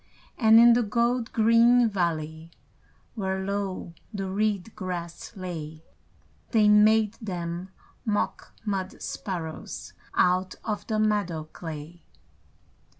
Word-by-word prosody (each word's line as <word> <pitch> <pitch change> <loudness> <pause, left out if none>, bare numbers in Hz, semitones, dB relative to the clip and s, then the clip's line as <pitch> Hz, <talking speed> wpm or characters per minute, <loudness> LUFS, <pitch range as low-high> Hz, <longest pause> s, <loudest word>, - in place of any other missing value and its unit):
And 225 -2 +6
in 235 0 +8
the 240 - +3
gold 235 +2 0
green 230 +2 +5
valley, 165 -5 -2 0.6
Where 190 -3 -2
low 195 -3 -3 0.2
the 195 -3 -3
reed 210 0 -1
grass 175 -3 -5
lay, 160 -4 -6 0.7
They 215 -3 +4
made 215 0 +5
them 175 -2 -4 0.3
mock 210 -2 -2
mud 195 -2 -3
sparrows 170 -5 -6 0.2
Out 185 +1 +2
of 210 -2 -3
the 220 - 0
meadow 205 -7 +1
clay. 160 +1 -8
195 Hz, 105 wpm, -27 LUFS, 175-215 Hz, 0.7 s, in